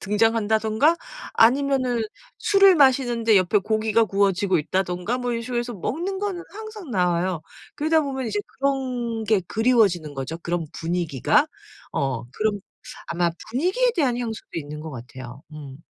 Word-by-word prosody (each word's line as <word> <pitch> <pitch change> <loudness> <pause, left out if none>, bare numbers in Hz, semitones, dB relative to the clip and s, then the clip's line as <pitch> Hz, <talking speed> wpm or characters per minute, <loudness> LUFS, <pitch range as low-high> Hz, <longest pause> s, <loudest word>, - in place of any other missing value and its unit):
등장한다든가 220 - +2 0.4
아니면은 255 0 +3 0.4
술을 395 -2 +6
마시는데 245 -6 +4
옆에 190 +2 +3
고기가 220 +2 +1
구워지고 195 -2 +1
있다든가 185 +8 -1
뭐 245 -1 -2
이런 230 0 -2
식으로 240 +1 -3
해서 240 0 -5
먹는 340 - -3
거는 390 -4 -3
항상 430 - -9
나와요. 180 -3 +1 0.4
그러다 315 +2 +3
보면 265 -4 -3
이제 210 -1 -1 0.2
그런 255 -4 -1
게 215 -1 +3
그리워지는 210 -10 +2
거죠 135 +5 -5
그런 170 -1 -3
분위기가. 175 - +1 0.5
어 135 -4 -1
그런 215 -1 -1 0.5
아마 170 0 0 0.2
분위기에 375 - +2
대한 270 -8 +1
향수도 225 -3 -5
있는 150 -2 -5
것 160 0 -7
같아요. 130 +1 -9
음. 140 -3 -9
220 Hz, 340 characters per minute, -23 LUFS, 175-265 Hz, 0.5 s, 술을